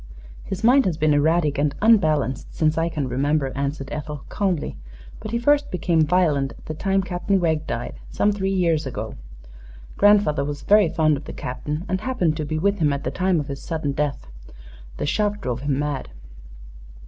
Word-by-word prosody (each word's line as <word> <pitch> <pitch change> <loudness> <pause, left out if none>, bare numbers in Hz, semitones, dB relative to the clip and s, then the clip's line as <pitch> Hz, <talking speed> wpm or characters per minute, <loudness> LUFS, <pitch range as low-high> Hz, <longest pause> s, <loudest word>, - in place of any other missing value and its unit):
"His 190 0 -5
mind 255 +4 +5
has 170 -4 -1
been 155 -1 +3
erratic 150 0 +2
and 145 -1 +1
unbalanced 155 - +2
since 155 -2 +2
I 165 +1 0
can 150 -4 -3
remember," 135 +2 0
answered 140 0 -3
Ethel, 150 -1 -6
calmly, 190 -7 -1 0.4
"but 215 - -7
he 235 - -1
first 290 +4 +2
became 175 -2 +1
violent 150 -6 +2
at - - -17
the 155 - -4
time 195 +4 0
Captain 185 +2 0
Wegg 160 -3 0
died, - - -4
some 205 - +1
three 195 -2 -1
years 170 -6 +1
ago. 110 -3 -5 0.8
Grandfather 205 -8 +4
was 145 0 -5
very 205 -4 +5
fond 155 -2 +2
of 140 - -10
the - - -7
Captain, 150 +6 -5
and 185 0 -1
happened 190 -12 0
to 155 - -2
be 155 +1 -2
with 200 +5 +1
him 150 -2 +3
at 140 0 -3
the - - -2
time 185 -2 +1
of 145 - -4
his 140 -1 -6
sudden 160 -4 -3
death. 140 - -2 0.7
The - - -2
shock 205 +6 0
drove 125 - -3
him 140 -1 0
mad." 145 -2 -3
155 Hz, 190 wpm, -23 LUFS, 145-190 Hz, 0.8 s, mind